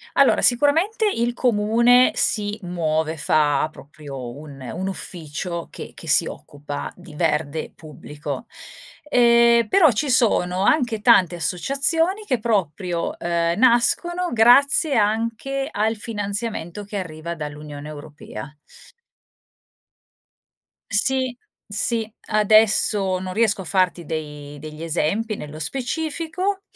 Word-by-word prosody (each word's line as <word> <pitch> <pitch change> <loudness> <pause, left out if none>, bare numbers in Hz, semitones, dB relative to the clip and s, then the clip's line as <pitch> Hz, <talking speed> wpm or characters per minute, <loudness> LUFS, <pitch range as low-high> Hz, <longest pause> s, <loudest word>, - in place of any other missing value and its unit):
Allora, - - +4
sicuramente 330 - +3
il 240 -6 -1
comune 235 +2 +3
si 210 0 0
muove, 160 -2 -1
fa 150 0 +2
proprio 140 -4 -9
un 145 -3 -11
un 180 +9 -5
ufficio 170 -2 -5
che - - -9
che - - -11
si - - +4
occupa 145 0 -7
di 165 -4 -14
verde 155 -1 -1
pubblico. 150 -1 -8 0.6
Ehm, 235 -2 +5
però 320 - +5
ci 270 +6 -1
sono 190 -7 +2
anche 240 -4 +1
tante 180 -4 +4
associazioni 325 - 0
che 255 - +1
proprio, 185 -5 -2
ehm, 170 0 -1
nascono 345 +9 +3
grazie 270 +6 +5
anche 230 +5 -1
al 220 +2 0
finanziamento 205 -3 -5
che 205 +1 -6
arriva 170 -2 -5
dall'Unione 150 -1 -8
Europea. 145 -3 -10 2.4
Sì, 260 +3 +1 0.3
sì, 220 +2 0 0.2
adesso 210 -2 +3
non 185 0 -5
riesco 215 -3 +1
a - - -7
farti 180 -2 0
dei 150 -2 -6
degli 155 +2 -9
esempi 175 +7 -1
nello 150 -4 -9
specifico, 320 - -3
205 Hz, 110 wpm, -22 LUFS, 155-240 Hz, 2.4 s, Ehm